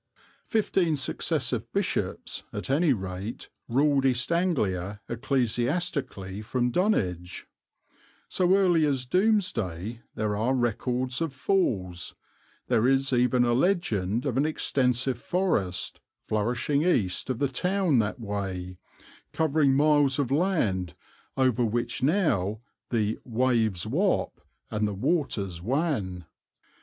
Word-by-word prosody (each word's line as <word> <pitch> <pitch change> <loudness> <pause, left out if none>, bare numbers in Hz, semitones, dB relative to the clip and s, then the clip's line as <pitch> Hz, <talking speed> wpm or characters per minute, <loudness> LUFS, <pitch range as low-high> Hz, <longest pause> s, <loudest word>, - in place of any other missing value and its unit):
Fifteen 190 -7 +1
successive 140 - -1
bishops, - - -2
at - - -4
any 155 +2 +3
rate, 95 -1 -4 0.2
ruled 140 +2 +2
East 130 +2 +1
Anglia 105 - 0
ecclesiastically 120 - -1
from 120 +2 -1
Dunwich. 95 - 0 0.8
So 185 0 +3
early 180 -5 +4
as 135 -3 -1
Domesday 120 - 0
there 105 -1 -1
are 115 +6 +1
records 125 +2 -1
of 160 -5 -2
falls; 100 - -1 0.5
there 115 +3 +2
is 135 0 +2
even 125 0 +3
a 120 -1 +2
legend 120 - +1
of 130 -3 -1
an 140 - +3
extensive 130 -4 +1
forest, 145 - -1 0.3
flourishing 120 +7 0
east 125 - +1
of 130 - -1
the 140 - +1
town 180 +1 +1
that 110 +4 -1
way, 95 -4 -4 0.5
covering 150 -3 +2
miles 145 -2 +4
of 135 -3 -1
land 120 - 0 0.4
over 130 -2 +2
which 120 +2 -1
now 130 - +1 0.3
the 110 -2 0
"waves 115 -6 +1
wap 175 - 0 0.3
and 105 0 0
the 105 - -3
waters 100 - -1
wan." 110 - -1
125 Hz, 115 wpm, -27 LUFS, 105-150 Hz, 0.8 s, early